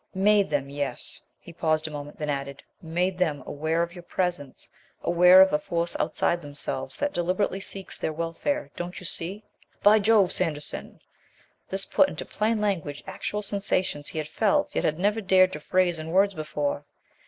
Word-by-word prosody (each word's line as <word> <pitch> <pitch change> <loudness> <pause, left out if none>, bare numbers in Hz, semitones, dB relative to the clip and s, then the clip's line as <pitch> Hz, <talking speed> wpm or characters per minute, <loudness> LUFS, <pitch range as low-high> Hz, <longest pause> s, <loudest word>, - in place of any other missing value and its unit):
"Made 200 0 +4
them, 140 -2 -1
yes," 145 -1 -4 0.2
he 170 - -13
paused 155 -1 0
a - - -7
moment, 145 0 -7
then 150 - -4
added, 140 0 -5 0.2
"made 180 +2 -1
them 150 -7 0
aware 160 +3 0
of 170 0 -5
your 180 - -9
presence; 175 -6 -3 0.4
aware 180 +2 +7
of 190 - 0
a 150 - +3
force 170 +2 -2
outside 170 0 0
themselves 145 -1 -5
that 290 0 -1
deliberately 185 +3 0
seeks 195 -1 -5
their - - -1
welfare, 170 - -2
don't 175 +1 -5
you 185 - -8
see?" 190 +5 -1 0.4
"By 210 +1 +7
Jove, 210 -3 +4
Sanderson 155 -5 -3 0.3
!" - - -35
This 195 0 -1
put 285 - +3
into - - -6
plain 220 +1 0
language 170 -9 -2
actual 205 +2 -4
sensations 190 -7 -1
he - - -6
had 155 -1 -2
felt, 290 - +1
yet - - 0
had 155 - +1
never 205 +4 +1
dared 185 -1 +4
to 150 - -5
phrase 175 +1 +1
in 155 +1 -6
words 195 +3 +3
before. 150 -3 -2
175 Hz, 180 wpm, -26 LUFS, 155-195 Hz, 0.4 s, aware